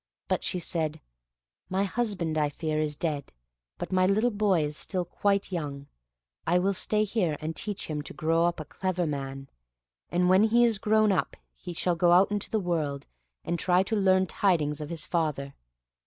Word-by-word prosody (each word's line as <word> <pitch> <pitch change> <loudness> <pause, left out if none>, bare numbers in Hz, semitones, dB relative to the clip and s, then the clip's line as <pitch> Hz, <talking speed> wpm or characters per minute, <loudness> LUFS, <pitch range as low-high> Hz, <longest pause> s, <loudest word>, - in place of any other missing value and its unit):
But - - 0
she 185 - -1
said, 160 -3 -2 0.7
"My 190 +1 +1
husband, 200 -6 -1
I 150 -2 +2
fear, 155 +1 -2
is 150 -1 -1
dead, 150 -3 -3 0.5
but - - -5
my 185 0 +3
little 215 +5 +2
boy 200 -6 +2
is 150 0 -3
still 180 +2 -2
quite 200 +3 0
young; 145 -5 -4 0.6
I 175 +2 +4
will 195 +2 +2
stay 210 +3 +2
here 190 -8 0
and 160 +1 -4
teach 205 -2 -3
him 150 -2 -3
to 145 - -6
grow 165 +2 +2
up 175 0 0
a 155 - -5
clever 180 +2 -2
man, 135 -2 -4 0.6
and 180 +1 +2
when 190 +3 +5
he 235 +2 +4
is 225 -3 +1
grown 215 -1 +3
up 190 - -1 0.2
he 180 - -8
shall 175 +1 0
go 175 +1 +4
out 190 +3 +5
into 205 -1 -2
the 220 - 0
world, 155 -7 -2 0.4
and 170 - -1
try 180 0 +3
and 195 - -3
learn 185 0 +4
tidings 160 -6 +1
of 150 - -5
his 165 -2 -3
father. 150 -5 -1
175 Hz, 190 wpm, -28 LUFS, 155-195 Hz, 0.7 s, when